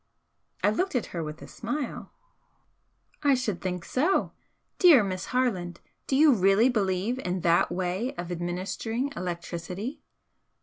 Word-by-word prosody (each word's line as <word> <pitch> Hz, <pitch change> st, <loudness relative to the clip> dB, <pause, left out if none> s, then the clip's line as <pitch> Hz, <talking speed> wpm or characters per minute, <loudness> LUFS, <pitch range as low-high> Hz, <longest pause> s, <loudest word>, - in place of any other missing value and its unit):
I 205 Hz, -, +4 dB
looked 365 Hz, -, -1 dB
at 245 Hz, -, +1 dB
her 170 Hz, -2 st, -2 dB
with 150 Hz, 0 st, -7 dB
a -, -, -10 dB
smile. 255 Hz, +3 st, -5 dB, 1.1 s
"I 285 Hz, -2 st, +4 dB
should 220 Hz, -8 st, -2 dB
think 180 Hz, -2 st, -3 dB
so! 320 Hz, +9 st, +1 dB, 0.5 s
Dear 320 Hz, -, +8 dB
Miss 185 Hz, -1 st, -3 dB
Harland, 190 Hz, -9 st, -1 dB, 0.3 s
do 265 Hz, -, +1 dB
you 295 Hz, 0 st, +6 dB
really 195 Hz, +3 st, +4 dB
believe 205 Hz, +1 st, 0 dB
in 180 Hz, -6 st, -2 dB
that 170 Hz, 0 st, +3 dB
way 185 Hz, +9 st, -2 dB
of 175 Hz, -5 st, -5 dB
administering 190 Hz, +9 st, -3 dB
electricity?" 180 Hz, -, -5 dB
200 Hz, 135 wpm, -27 LUFS, 180-255 Hz, 1.1 s, Dear